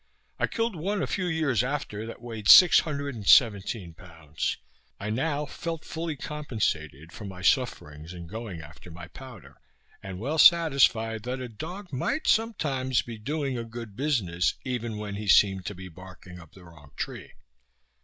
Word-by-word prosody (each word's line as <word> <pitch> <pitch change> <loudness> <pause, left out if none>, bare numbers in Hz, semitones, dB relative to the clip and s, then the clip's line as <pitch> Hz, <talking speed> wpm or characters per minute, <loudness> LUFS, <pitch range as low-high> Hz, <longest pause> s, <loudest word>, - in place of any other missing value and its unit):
I - - +2
killed 230 -3 -2
one, 195 +5 -2
a - - +1
few 185 -2 -2
years 155 -9 +1
after, 125 -6 -4
that 115 +1 -9
weighed 110 -4 -4
six 180 -2 +10
hundred 145 -3 -3
and 105 -5 -8
seventeen 100 - +4
pounds. 80 -3 -5 0.4
I 105 +2 -3
now 145 +5 -1
felt 165 +2 -6
fully 165 -1 -4
compensated 95 - -3
for 105 - -8
my 95 -2 -8
sufferings 80 - 0
in 85 -1 -8
going 100 -2 -7
after 80 +3 -13
my 85 +1 -10
powder; 130 -8 -12 0.4
and 95 -1 -7
well 140 - -2
satisfied 135 -10 +5
that 130 +1 -3
a 130 - -5
dog 180 - -8
might 275 - -1
sometimes 140 - +1
be 115 -2 -8
doing 140 +1 -2
a - - -3
good 115 -2 -9
business, 105 - 0
even 120 -4 -3
when 105 -1 -5
he 105 0 -6
seemed 95 -1 +4
to 105 - -5
be 95 +1 -9
barking 90 0 -12
up 80 -3 -15
the 95 - -15
wrong 80 -4 -16
tree. - - -6
115 Hz, 170 wpm, -27 LUFS, 95-145 Hz, 0.4 s, six